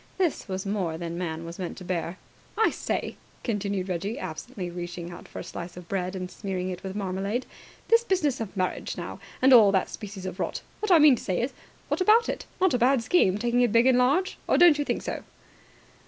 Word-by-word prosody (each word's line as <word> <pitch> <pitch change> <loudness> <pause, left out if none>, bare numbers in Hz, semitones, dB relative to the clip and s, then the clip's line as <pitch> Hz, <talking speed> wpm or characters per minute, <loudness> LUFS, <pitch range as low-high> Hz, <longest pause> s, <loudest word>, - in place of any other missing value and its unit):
This 350 -10 0
was 190 0 -4
more 190 -5 -1
than 170 0 -5
man 165 -2 -4
was 170 +2 -8
meant 180 -2 -4
to 185 - -8
bear. 175 -1 -3 0.4
"I 445 - +4
say," - - -3 0.3
continued 200 -4 -2
Reggie, 195 +6 -2
absently 185 - -6
reaching 175 0 -6
out 175 - -10
for - - -11
a - - -4
slice 175 +1 -7
of 180 -1 -10
bread 185 -1 -2
and 185 -1 -5
smearing 185 -2 -3
it 180 - -6
with 190 0 -6
marmalade, 200 +4 -2 0.4
"this 460 0 +5
business 305 - +1
of 210 -2 -6
marriage, 185 -1 -2
now, - - -6 0.2
and 265 0 +7
all 215 -5 +8
that 190 - +2
species 200 -2 -7
of 185 0 -5
rot! - - -3 0.2
What 425 - -2
I 350 - +9
mean 295 -5 +7
to - - -9
say 185 -2 -1
is, 245 +4 -1 0.3
what - - -1
about 440 +5 +5
it? - - -4
Not 375 -1 +3
a 250 - +2
bad 255 0 +3
scheme, 220 - +3
taking 240 +2 +1
it 240 -3 +3
by 230 +1 +6
and 250 0 +4
large? 285 +10 +2
Or - - +3
don't 335 -4 +7
you 290 - 0
think - - -2
so?" - - -4
200 Hz, 225 wpm, -27 LUFS, 180-255 Hz, 0.4 s, I